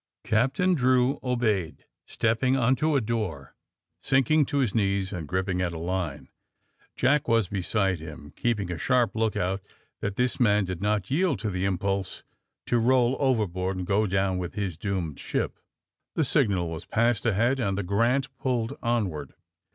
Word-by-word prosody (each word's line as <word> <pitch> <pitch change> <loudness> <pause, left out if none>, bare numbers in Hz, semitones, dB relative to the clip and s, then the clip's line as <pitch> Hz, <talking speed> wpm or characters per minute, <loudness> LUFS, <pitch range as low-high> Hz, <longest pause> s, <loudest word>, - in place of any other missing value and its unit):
Captain 135 +12 +2
Drew 130 -1 +2
obeyed, 110 -10 -1 0.2
stepping 125 +4 +1
on 130 +1 +3
to 155 +3 +1
a 135 - +3
door, 105 - -3 0.5
sinking 135 +3 +3
to 145 - -1
his 130 -7 +1
knees 100 -3 0
and 85 -5 -5
gripping 95 +1 -1
at 90 -2 -1
a - - -5
line. 85 -3 -3 0.7
Jack 150 +1 +2
was 115 -4 +3
beside 95 -1 0
him, 75 -2 -10
keeping 105 -7 -1
a 85 - -4
sharp 120 - +2
lookout 100 -4 0 0.4
that 100 0 -3
this 125 +2 0
man 105 -4 +3
did 90 -1 -5
not 105 -1 +1
yieM 150 - +1
to 110 - -3
the 90 +1 -1
impnlse 95 0 -2 0.4
to 120 - +1
roll 125 +1 +3
overboard 95 -8 0
and 90 - -3
go 100 +3 +2
down 95 -1 0
with 90 -1 -5
his 100 -5 -2
doomed 90 -5 -3
ship. - - -3 0.6
The 160 - +2
signal 100 - +2
was 80 +1 -6
passed 115 -1 +1
ahead, 115 +5 +2
and 100 -5 0
the 100 - -1
^^ - - -8
Grant" 120 +7 +1
pulled 120 -4 -1
onward. 95 - -2
105 Hz, 165 wpm, -26 LUFS, 95-125 Hz, 0.7 s, on